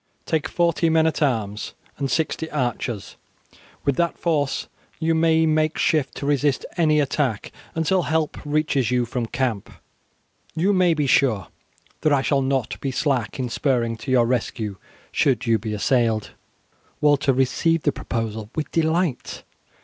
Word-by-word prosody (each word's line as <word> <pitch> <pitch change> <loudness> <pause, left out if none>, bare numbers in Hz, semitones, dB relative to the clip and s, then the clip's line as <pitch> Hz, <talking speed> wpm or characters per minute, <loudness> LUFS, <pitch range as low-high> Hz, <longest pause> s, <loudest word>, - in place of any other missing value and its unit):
Take 160 -3 0
forty 170 -1 +1
men 160 0 +3
at 160 0 0
arms 110 -7 -1 0.2
and 140 -2 -1
sixty 160 +1 -1
archers. 120 -6 -3 0.7
With 140 -2 +1
that 170 -1 0
force 150 -5 0 0.3
you 165 0 +1
may 160 0 +3
make 155 0 +1
shift 150 -4 +1
to - - -5
resist 145 -1 +1
any 155 -3 +3
attack 135 -6 -1 0.2
until 165 +3 +2
help 160 -1 -1
reaches 145 -5 0
you 125 -1 +1
from 120 0 -3
camp. 125 -5 -2 0.9
You 185 +5 +2
may 180 -3 +3
be 150 -2 0
sure 125 -7 +2 0.5
that 155 - +2
I 140 -2 +3
shall 140 -1 +2
not 130 -3 -1
be 135 - -1
slack 130 -4 -1
in 130 -2 -2
spurring 120 -2 0
to 130 - -8
your 125 -2 +4
rescue 115 -4 -2 0.3
should 135 -4 +1
you 115 -2 +3
be 110 +2 -5
assailed." 110 0 +1 0.7
Walter 145 -1 +3
received 140 +5 +1
the - - +4
proposal 110 -2 -4
with 155 - -3
delight. 165 -2 0
140 Hz, 150 wpm, -23 LUFS, 120-160 Hz, 0.9 s, your